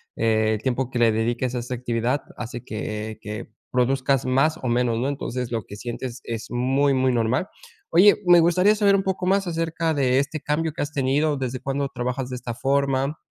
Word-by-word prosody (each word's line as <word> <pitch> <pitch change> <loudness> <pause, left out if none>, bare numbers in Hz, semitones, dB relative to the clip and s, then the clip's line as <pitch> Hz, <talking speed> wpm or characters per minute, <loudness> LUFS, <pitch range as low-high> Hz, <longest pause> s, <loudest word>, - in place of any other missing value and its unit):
el 110 -1 +1
tiempo 130 0 -1
que 120 - -2
le 115 -1 +5
dediques 120 +3 -1
a - - 0
esta 125 +2 -5
actividad 120 +2 -1 0.2
hace 120 +1 -6
que 110 0 -5
que 105 +2 -6 0.2
produzcas 130 +1 +1
más, 135 +5 +2
o 130 - -1
menos, 120 -1 +1
¿no? 130 - 0
Entonces, 125 -3 -4
lo 115 -2 -1
que 100 - -9
sientes 120 +2 -6
es 115 -1 -5
muy 135 +3 +2
muy 130 0 +2
normal. 120 +8 +1 0.4
Oye, 195 +4 +7
me 175 -1 +8
gustaría 180 +5 +4
saber 200 -2 +4
un 195 - +2
poco 190 -1 -2
más 195 0 +2
acerca 165 -1 -1
de 130 -2 +2
este 145 +2 -2
cambio 155 +1 -1
que - - -4
has 145 - -5
tenido, 145 +2 +1
¿desde 130 -1 -3
cuándo 140 +1 -2
trabajas 125 0 -3
de 130 - -4
esta 120 -1 -5
forma? 135 +2 0
130 Hz, 200 wpm, -23 LUFS, 120-145 Hz, 0.4 s, me